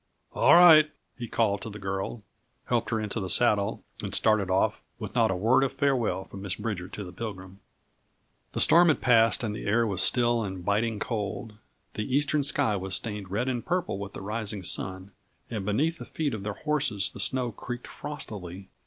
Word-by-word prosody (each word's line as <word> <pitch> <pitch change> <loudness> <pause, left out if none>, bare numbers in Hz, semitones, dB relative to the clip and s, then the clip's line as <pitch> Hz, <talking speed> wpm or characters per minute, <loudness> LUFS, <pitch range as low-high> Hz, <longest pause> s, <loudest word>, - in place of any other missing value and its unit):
"All - - +5
right," 160 -3 +8 0.3
he 120 - -6
called 105 -3 0
to - - -6
the 105 - -8
girl; 95 +2 -4 0.4
helped 120 -2 0
her 115 - 0
into 110 +1 -3
the 95 -3 -4
saddle 105 -3 +2 0.2
and - - -3
started 110 -4 +2
off, 95 +1 +1 0.2
with - - -7
not - - +3
a 95 - 0
word 115 +8 +3
of 135 - 0
farewell 130 -8 0
from 95 - -11
Miss 95 -2 -3
Bridger 105 -5 -4
to 105 - -7
the 90 - -9
Pilgrim. 95 -2 -8 0.9
The - - 0
storm 175 +1 +6
had 155 - +3
passed 115 -1 +4
and 105 -2 -2
the 105 - -6
air 115 +3 +3
was 100 -4 -1
still 120 -1 +2
and 95 -3 -6
biting 110 +2 0
cold. 105 0 -4 0.3
The 105 +5 -2
eastern 145 +1 +2
sky 140 -5 0
was 95 0 -1
stained 105 -4 -4
red 110 +7 -1
and 125 -2 -2
purple 180 - -2
with 100 0 -7
the - - -7
rising 105 -1 -2
sun, 95 +2 -1 0.4
and 105 -4 -3
beneath 150 +11 0
the - - -7
feet 150 -4 -2
of 110 - -4
their 105 +1 -4
horses 130 -11 -1
the - - -11
snow 130 -2 0
creaked 120 +3 -7
frostily. 95 - -8
110 Hz, 195 wpm, -27 LUFS, 100-125 Hz, 0.9 s, right